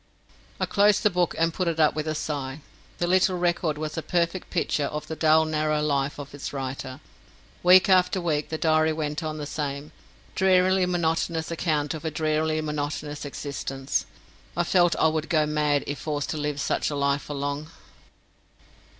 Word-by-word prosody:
I - - +1
closed 205 0 +3
the 210 - +4
book 175 -1 0
and 165 0 +1
put 185 0 -1
it 165 -1 -1
up 155 -1 +4
with 155 +1 -3
a 155 - -1
sigh. 145 -2 -4 0.4
The 175 - 0
little 185 +1 +3
record 170 -3 0
was 155 0 -4
a 165 - -2
perfect 170 +2 -1
picture 155 -4 0
of 150 +1 -4
the 160 - -5
dull 160 0 +4
narrow 155 -1 0
life 140 -1 0
of 140 -1 -8
its 145 - -6
writer. 135 -1 -5 0.6
Week 180 +1 +7
after 185 +1 +4
week 155 -4 -1
that 160 - -4
diary 155 0 +3
went 150 0 -3
on 155 -1 -4
the 150 - -4
same 145 0 -4 0.4
drearily 185 0 +3
monotonous 165 -1 -1
account 155 -4 0
of 160 - -7
a 160 - -1
drearily 155 0 0
monotonous 150 -1 -4
existence. 135 -1 -3 0.5
I 175 - +3
felt 175 -1 +3
I - - +2
would 155 0 -1
go 155 -3 +3
mad 150 -1 +1
if 145 - -4
forced 145 -2 -3
to 155 - -3
live 150 -1 -2
such - - 0
a 145 - -3
life 140 0 +1
for 145 - -7
long. 145 +2 -3
155 Hz, 185 wpm, -25 LUFS, 145-170 Hz, 0.6 s, Week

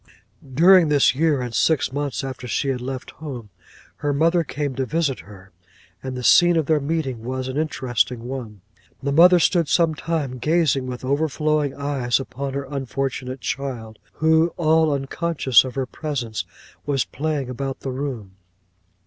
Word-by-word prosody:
'During 165 +5 +5
this 145 -2 +4
year, 150 -1 +1
and 120 -2 -5
six 155 0 +1
months 145 0 -2
after 130 -2 -6
she 135 - -1
had 130 -2 -2
left 130 0 -6
home, 125 -9 -8 0.5
her 145 - -1
mother 165 +4 +2
came 145 -1 -3
to 130 +1 -2
visit 145 0 -1
her, 95 -2 -14 0.5
and 130 -1 -5
the 125 - -5
scene 175 +6 +6
of 160 - +1
their 155 +1 +2
meeting 140 -5 -3
was 130 +1 -3
an 130 - -5
interesting 125 -6 -1
one. 120 -6 -7 0.4
'The 140 - 0
mother 175 +5 +7
stood 170 -1 +2
some 165 +1 +3
time, 150 -5 -3
gazing 150 -3 +1
with 125 0 -6
overflowing 150 0 0
eyes 140 -4 0
upon 135 +1 -5
her 140 0 -3
unfortunate 135 -1 -3
child, 120 -6 -5
who, 160 +1 +3
all 160 -1 +3
unconscious 140 -1 +2
of 130 -1 -7
her 135 -1 -1
presence, 120 - -4 0.4
was 140 -3 0
playing 150 -1 -3
about 135 +2 -5
the 135 - -4
room. 125 -8 -5
135 Hz, 160 wpm, -22 LUFS, 125-155 Hz, 0.5 s, mother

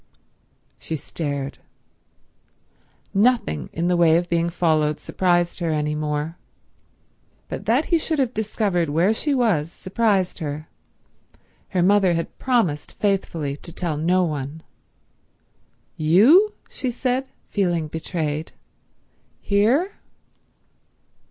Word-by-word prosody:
She 160 - -4
stared. 140 -2 -4 1.5
Nothing 205 - +2
in 170 +2 -1
the 180 - +2
way 165 -2 +5
of 175 0 -2
being 170 0 +1
followed 155 -3 +1
surprised 175 -2 0
her 170 -2 -1
any 150 -1 0
more, 150 +2 -3 1.1
but - - -6
that 255 +7 +3
he 335 - +5
should 315 0 -1
have 260 -3 +1
discovered 200 -6 0
where 170 +8 +3
she 285 +5 -1
was 185 - +1
surprised 195 -2 0
her. 155 -1 -5 1.0
Her 180 -2 +1
mother 190 -2 +4
had 165 - -4
promised 225 - 0
faithfully 170 -8 -1
to 170 - -9
tell 170 -2 -2
no 175 +5 +2
one. 150 -1 -4 1.3
"You?" 245 - +5
she 260 - -4
said, 255 +2 -1 0.2
feeling 175 -6 0
betrayed. 155 -1 -3 0.9
"Here?" 240 - +2
175 Hz, 110 wpm, -23 LUFS, 155-215 Hz, 1.5 s, way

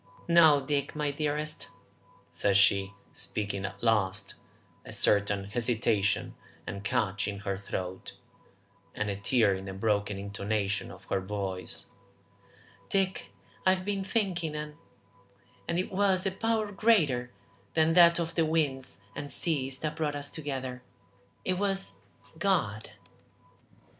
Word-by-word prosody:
"No, 160 -5 +6
Dick, 140 0 -1
my 150 -1 0
dearest," 150 +1 -2 0.6
said 100 -1 +3
she, 100 0 +4 0.2
speaking 100 -2 -3
at 100 - -7
last, 100 -3 +1 0.5
a - - -10
certain 100 -1 +3
hesitation 110 -2 +1 0.3
and 100 0 -5
catch 100 -1 0
in 100 -1 -4
her 100 -2 -1
throat 95 -1 -5 0.8
and 105 -1 -1
a - - -2
tear 100 +1 +3
in 95 0 -5
the 95 - -5
broken 100 0 0
intonation 100 0 -2
of - - -12
her 95 - -1
voice, 95 -1 -4 1.0
"Dick, 190 -1 +1 0.4
I've 185 0 +3
been 200 -1 -1
thinking 180 -7 -1
and 150 0 -4 0.9
and 170 - 0
it 185 +3 -1
was 190 -1 +2
a 195 - +2
power 220 +1 0
greater 165 - +3 0.5
than 160 0 +4
that 170 -1 +7
of 170 -1 -2
the 165 - +2
winds 145 -8 0
and 145 0 -5
seas 135 -5 0
that 155 -1 -2
brought 150 -2 0
us 145 0 -3
together. 130 -5 -4 0.6
It 185 0 0
was 195 -1 0 0.5
God!" 145 - +1
135 Hz, 130 wpm, -30 LUFS, 100-170 Hz, 1.0 s, that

